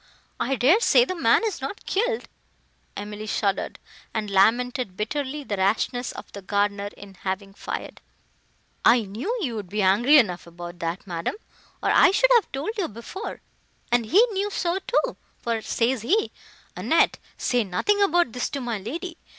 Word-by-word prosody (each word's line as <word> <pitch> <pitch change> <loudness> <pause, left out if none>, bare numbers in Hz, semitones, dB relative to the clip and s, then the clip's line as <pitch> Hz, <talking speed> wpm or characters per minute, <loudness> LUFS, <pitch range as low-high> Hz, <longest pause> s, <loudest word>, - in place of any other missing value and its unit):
I 270 +2 0
dare 270 - +5
say 485 +1 +5
the 370 - -3
man 340 - +3
is 410 -10 -3
not 275 +10 -6
killed." 455 +3 0 0.7
Emily 210 +1 -6
shuddered, 200 -2 -1 0.4
and 210 -2 -2
lamented 225 +1 +2
bitterly 285 +6 -3
the 205 -6 -3
rashness 225 +5 0
of - - -10
the 200 - -8
gardener 200 +1 0
in 200 -1 -11
having 195 +1 -4
fired. - - -6 0.8
"I 235 -1 +6
knew 215 - -4
you 245 -6 -2
would 205 -4 -6
be 210 +1 0
angry 235 +11 +6
enough 180 -10 +2
about 175 +1 -9
that, 170 +3 -3
madam, 170 - -3 0.5
or - - +3
I - - +7
should - - +3
have 470 -3 +3
told 320 - -3
you 360 - 0
before; 235 - -7 0.5
and 240 -2 +2
he 405 - +6
knew 400 +1 -1
so 365 -2 -1
too; - - 0 0.2
for, 230 -1 -2
says 235 +2 0
he, 405 - +1 0.4
'Annette, - - +2 0.2
say 245 -2 +1
nothing 405 - +1
about 350 - +3
this 250 +2 -2
to 280 - -4
my 240 -4 -3
lady. 330 - -6
240 Hz, 165 wpm, -25 LUFS, -, 0.8 s, I